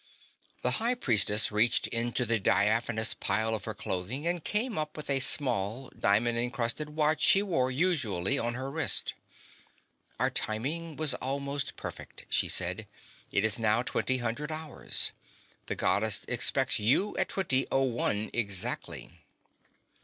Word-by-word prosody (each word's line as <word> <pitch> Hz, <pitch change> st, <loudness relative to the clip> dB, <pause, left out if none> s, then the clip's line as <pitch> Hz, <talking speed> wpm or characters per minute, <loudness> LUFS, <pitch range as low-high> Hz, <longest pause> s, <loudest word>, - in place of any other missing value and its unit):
The -, -, +2 dB
High 240 Hz, +2 st, +1 dB
Priestess 110 Hz, -, +3 dB
reached 105 Hz, +3 st, +2 dB
into 120 Hz, +1 st, -1 dB
the 115 Hz, -1 st, +1 dB
diaphanous 110 Hz, +3 st, +2 dB
pile 110 Hz, 0 st, -1 dB
of 105 Hz, -2 st, -4 dB
her 110 Hz, -, -5 dB
clothing 100 Hz, -, -4 dB
and 175 Hz, -1 st, -1 dB
came 220 Hz, +2 st, -1 dB
up 155 Hz, 0 st, -4 dB
with 150 Hz, -2 st, -4 dB
a 135 Hz, -, +5 dB
small 125 Hz, -3 st, +2 dB
diamond 115 Hz, +4 st, +1 dB
encrusted 120 Hz, +5 st, -2 dB
watch 155 Hz, 0 st, +1 dB
she 200 Hz, 0 st, +5 dB
wore, 150 Hz, -11 st, 0 dB
usually, 135 Hz, -, 0 dB
on 120 Hz, 0 st, -2 dB
her 130 Hz, +2 st, -5 dB
wrist. 160 Hz, +2 st, +1 dB, 1.1 s
"Our -, -, +1 dB
timing 150 Hz, +9 st, -1 dB
was 155 Hz, -1 st, +5 dB
almost 140 Hz, +1 st, -4 dB
perfect," -, -, -9 dB
she -, -, +1 dB
said. -, -, -1 dB, 0.4 s
"It 100 Hz, -, +3 dB
is 110 Hz, +1 st, +2 dB
now 110 Hz, +2 st, +2 dB
twenty 130 Hz, +2 st, 0 dB
hundred 125 Hz, +6 st, -3 dB
hours. 155 Hz, -1 st, -1 dB, 0.6 s
The -, -, -3 dB
Goddess -, -, +1 dB
expects -, -, +2 dB
you 130 Hz, -, +1 dB
at -, -, +1 dB
twenty 135 Hz, -9 st, 0 dB
oh 135 Hz, -, +2 dB
one 115 Hz, -4 st, 0 dB
exactly." 100 Hz, -5 st, -3 dB
125 Hz, 145 wpm, -29 LUFS, 110-150 Hz, 1.1 s, a